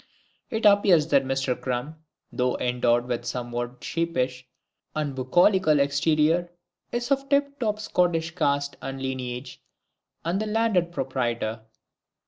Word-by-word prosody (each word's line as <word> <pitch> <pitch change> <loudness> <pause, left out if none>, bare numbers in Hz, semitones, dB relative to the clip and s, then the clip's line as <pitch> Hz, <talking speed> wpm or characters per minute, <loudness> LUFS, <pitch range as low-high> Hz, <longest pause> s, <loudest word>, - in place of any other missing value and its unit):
It 220 -1 -2
appears 195 -6 +5
that 135 - +3
Mister 135 -1 0
CRUM, 125 +3 -3 0.4
though 125 -1 0
endowed 120 -1 +1
with 120 -1 -2
a - - -16
somewhat 120 0 -4
sheepish 130 -6 -2 0.5
and 150 -2 -1
bucolical 155 +4 +3
exterior, 155 +4 +2 0.4
is 240 +3 -3
of 275 0 +1
tip 280 0 +1
top 215 -3 -1
Scottish 175 -5 0
caste 140 -4 0
and 135 0 -5
lineage, 130 -1 -5 0.6
and 180 +5 0
the 215 - -2
landed 210 -6 +1
proprietor. 120 -6 -2
145 Hz, 125 wpm, -25 LUFS, 125-180 Hz, 0.6 s, appears